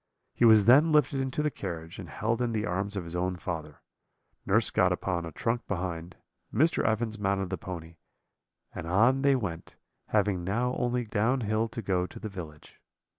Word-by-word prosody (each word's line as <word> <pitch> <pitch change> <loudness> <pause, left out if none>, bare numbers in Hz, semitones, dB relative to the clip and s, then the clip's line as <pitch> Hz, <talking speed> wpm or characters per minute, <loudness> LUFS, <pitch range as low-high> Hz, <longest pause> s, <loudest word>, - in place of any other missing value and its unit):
He 120 - +3
was 110 -3 +7
then 145 +8 +6
lifted 150 -2 +3
into 135 +3 -2
the 150 - +1
carriage, 85 -5 -6
and - - -8
held 115 +3 -1
in 120 -2 0
the 105 -1 -1
arms 100 +3 -2
of 95 - -2
his 85 +1 -7
own 90 +1 -1
father; 80 -5 -6 0.6
nurse - - +3
got - - +3
upon 85 -3 -2
a - - -7
trunk 115 +9 -2
behind, 90 -2 -4 0.4
Mr. 160 +4 +2
Evans 110 0 0
mounted 95 -2 -1
the 95 - -1
pony, 85 -2 -8 0.8
and 80 - -6
on 115 +9 +3
they 140 0 +4
went, 90 -9 -4 0.3
having 100 -4 +1
now 120 +7 0
only 125 0 -1
down 115 +5 +1
hill 110 +1 0
to 115 0 -6
go 90 -2 0
to - - -11
the 110 - -5
village. 80 -6 -10
100 Hz, 185 wpm, -29 LUFS, 90-120 Hz, 0.8 s, was